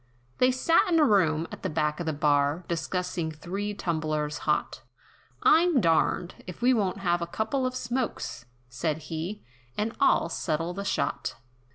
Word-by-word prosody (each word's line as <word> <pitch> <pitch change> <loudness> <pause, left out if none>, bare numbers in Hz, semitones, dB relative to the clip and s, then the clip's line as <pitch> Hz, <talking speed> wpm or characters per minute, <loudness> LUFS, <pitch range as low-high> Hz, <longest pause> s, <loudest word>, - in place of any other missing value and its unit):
They 255 - +5
sat 260 +6 +3
in 330 - +4
a 305 - +6
room, 165 - +3
at - - -8
the 190 - -2
back 150 -1 0
of 170 - -4
the - - +2
bar, 145 +2 +2
Discussing 175 0 -2
three 195 +6 -4
tumblers 155 -4 -2
hot, 150 - 0 0.6
"I'm 335 -3 +5
darned, 170 -1 +2
if 180 - -8
we 250 +2 +4
won't 195 -4 0
have 175 -2 +1
a 170 - -2
couple 220 +8 -1
of 255 - -4
smokes!" 240 - -3 0.2
Said 130 +5 -2 0.2
he, 175 +7 -4 0.3
"And 220 +2 -1
I'll - - +4
settle 165 +1 -2
the 200 +2 -5
shot." - - -1
175 Hz, 165 wpm, -27 LUFS, 155-220 Hz, 0.6 s, a